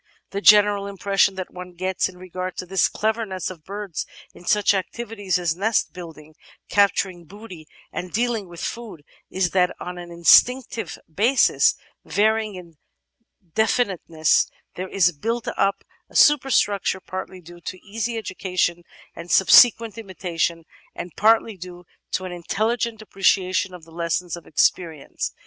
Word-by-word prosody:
The 200 Hz, -, -3 dB
general 205 Hz, -1 st, +5 dB
impression 200 Hz, 0 st, +1 dB
that 185 Hz, -1 st, -6 dB
one 180 Hz, 0 st, -9 dB
gets 185 Hz, +1 st, -1 dB
in 180 Hz, -, -14 dB
regard 185 Hz, 0 st, -6 dB
to -, -, -4 dB
the 190 Hz, +1 st, +2 dB
clever 220 Hz, +2 st, -1 dB
ness 190 Hz, -3 st, -4 dB
of 165 Hz, -4 st, -12 dB
birds 200 Hz, -3 st, -5 dB, 0.3 s
in 175 Hz, -, -15 dB
such 210 Hz, +1 st, +3 dB
activities 205 Hz, 0 st, -2 dB
as 175 Hz, -2 st, -1 dB
nest 210 Hz, +4 st, 0 dB
building, 160 Hz, -3 st, -11 dB, 0.4 s
capturing 195 Hz, -3 st, +1 dB
booty, 185 Hz, -3 st, -12 dB, 0.2 s
and 180 Hz, 0 st, -6 dB
dealing 230 Hz, -3 st, -1 dB
with 170 Hz, -1 st, -10 dB
food 225 Hz, -10 st, -6 dB, 0.3 s
is 185 Hz, -2 st, 0 dB
that 180 Hz, -1 st, +2 dB
on 180 Hz, 0 st, -6 dB
an 175 Hz, 0 st, -9 dB
instinctive 225 Hz, +5 st, +3 dB
basis, 225 Hz, -, +3 dB, 0.3 s
varying 215 Hz, 0 st, +1 dB
in 170 Hz, -4 st, -12 dB, 0.8 s
definiteness, 190 Hz, -8 st, +1 dB, 0.3 s
there 185 Hz, +1 st, -6 dB
is 180 Hz, -3 st, +3 dB
built 225 Hz, +9 st, -3 dB
up 195 Hz, 0 st, 0 dB, 0.3 s
a -, -, -20 dB
superstructure 250 Hz, -10 st, +3 dB
partly 185 Hz, 0 st, -7 dB
due 175 Hz, 0 st, -14 dB
to 185 Hz, -, -6 dB
easy 225 Hz, +3 st, -3 dB
education 185 Hz, -4 st, -2 dB, 0.3 s
and 170 Hz, +1 st, -9 dB
subsequent 230 Hz, +4 st, +6 dB
imitation, 175 Hz, -5 st, -3 dB, 0.3 s
and 175 Hz, -, -7 dB
partly 220 Hz, 0 st, +3 dB
due 180 Hz, 0 st, -10 dB, 0.3 s
to 185 Hz, -, -1 dB
an 185 Hz, -, -6 dB
intelli 215 Hz, +7 st, -1 dB
gent 225 Hz, -2 st, -3 dB
appreciation 190 Hz, -2 st, +1 dB
of 180 Hz, -2 st, -11 dB
the 165 Hz, -, -16 dB
lessons 170 Hz, +1 st, -2 dB
of 170 Hz, -3 st, -13 dB
experience. 160 Hz, -1 st, -1 dB
185 Hz, 145 wpm, -23 LUFS, 175-210 Hz, 0.8 s, subsequent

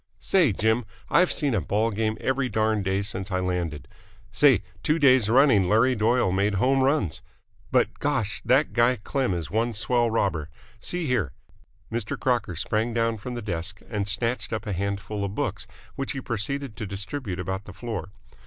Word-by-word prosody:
"Say, 175 Hz, -, +3 dB
Jim, 110 Hz, +4 st, +1 dB, 0.3 s
I've 180 Hz, +1 st, +4 dB
seen 145 Hz, -4 st, 0 dB
a 100 Hz, -, +1 dB
ball 105 Hz, +8 st, 0 dB
game 110 Hz, +1 st, -1 dB
every 130 Hz, 0 st, 0 dB
darned 110 Hz, -3 st, +1 dB
day 95 Hz, +1 st, +1 dB
since 100 Hz, -1 st, -4 dB
I 95 Hz, -1 st, 0 dB
landed! 85 Hz, -6 st, -2 dB, 0.4 s
Say, 130 Hz, +2 st, +4 dB, 0.2 s
two 155 Hz, -, +2 dB
days 130 Hz, -7 st, +5 dB
running 115 Hz, -7 st, +5 dB
Larry 115 Hz, +5 st, +4 dB
Doyle 115 Hz, -2 st, +2 dB
made 100 Hz, +2 st, +1 dB
home 130 Hz, +7 st, +3 dB
runs! 130 Hz, -, +1 dB, 0.5 s
But, -, -, +2 dB
gosh! 130 Hz, -8 st, -1 dB
that 135 Hz, +4 st, +3 dB
guy 120 Hz, +1 st, +4 dB
Klem 125 Hz, -1 st, -1 dB
is 80 Hz, -3 st, -5 dB
one 115 Hz, +3 st, +1 dB
swell 120 Hz, +2 st, +1 dB
robber! 95 Hz, -9 st, 0 dB, 0.3 s
See 175 Hz, +7 st, -3 dB
here!" 125 Hz, -, 0 dB, 0.6 s
Mr. 115 Hz, -2 st, -3 dB
Crocker 120 Hz, -8 st, 0 dB
sprang 110 Hz, +7 st, -1 dB
down 115 Hz, -1 st, +1 dB
from 125 Hz, +4 st, -6 dB
the 120 Hz, -, -5 dB
desk, 95 Hz, 0 st, -4 dB
and 100 Hz, -3 st, -1 dB
snatched 115 Hz, +4 st, -1 dB
up 110 Hz, 0 st, -3 dB
a 105 Hz, -, -2 dB
handful 100 Hz, +2 st, -3 dB
of 100 Hz, 0 st, -3 dB
books, -, -, -2 dB, 0.3 s
which 135 Hz, -, -3 dB
he 135 Hz, -, -4 dB
proceeded 125 Hz, +2 st, -3 dB
to 110 Hz, -4 st, -4 dB
distribute 100 Hz, 0 st, -5 dB
about 95 Hz, +2 st, -3 dB
the -, -, -9 dB
floor. 110 Hz, -6 st, -5 dB
110 Hz, 180 wpm, -26 LUFS, 100-125 Hz, 0.6 s, days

